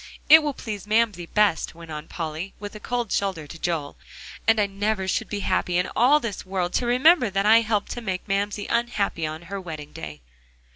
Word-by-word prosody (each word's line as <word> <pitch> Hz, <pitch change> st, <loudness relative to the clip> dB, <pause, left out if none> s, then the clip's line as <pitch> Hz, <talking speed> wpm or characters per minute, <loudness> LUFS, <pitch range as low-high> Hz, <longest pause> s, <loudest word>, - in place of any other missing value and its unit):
"It 320 Hz, +2 st, +10 dB
will 295 Hz, -3 st, -2 dB
please 210 Hz, -4 st, -6 dB
Mamsie 215 Hz, -5 st, +1 dB
best," 210 Hz, -6 st, +1 dB
went 165 Hz, -1 st, -11 dB
on 150 Hz, 0 st, -6 dB
Polly, 165 Hz, +3 st, -5 dB
with 205 Hz, 0 st, -7 dB
a 215 Hz, -, -9 dB
cold 240 Hz, 0 st, -3 dB
shoulder 190 Hz, -6 st, -1 dB
to 165 Hz, +3 st, -11 dB
Joel. 160 Hz, -5 st, -2 dB, 0.5 s
"And 225 Hz, -1 st, +5 dB
I 210 Hz, -, +4 dB
never 200 Hz, 0 st, -2 dB
should 215 Hz, +3 st, -1 dB
be 205 Hz, -1 st, -3 dB
happy 180 Hz, -2 st, 0 dB
in 180 Hz, +1 st, 0 dB
all 265 Hz, +6 st, +5 dB
this 230 Hz, -7 st, -5 dB
world 185 Hz, -2 st, -2 dB
to 245 Hz, -, 0 dB
remember 255 Hz, +1 st, +5 dB
that 195 Hz, +1 st, 0 dB
I 225 Hz, +2 st, +7 dB
helped 215 Hz, -2 st, -1 dB
to 240 Hz, -, -5 dB
make 190 Hz, -4 st, -4 dB
my 195 Hz, -, 0 dB
Mamsie 205 Hz, +1 st, -1 dB
unhappy 215 Hz, -8 st, 0 dB
on 155 Hz, +2 st, -7 dB
her 195 Hz, +3 st, -6 dB
wedding 155 Hz, -4 st, -8 dB
day." 75 Hz, -2 st, -8 dB
200 Hz, 210 wpm, -24 LUFS, 175-225 Hz, 0.5 s, It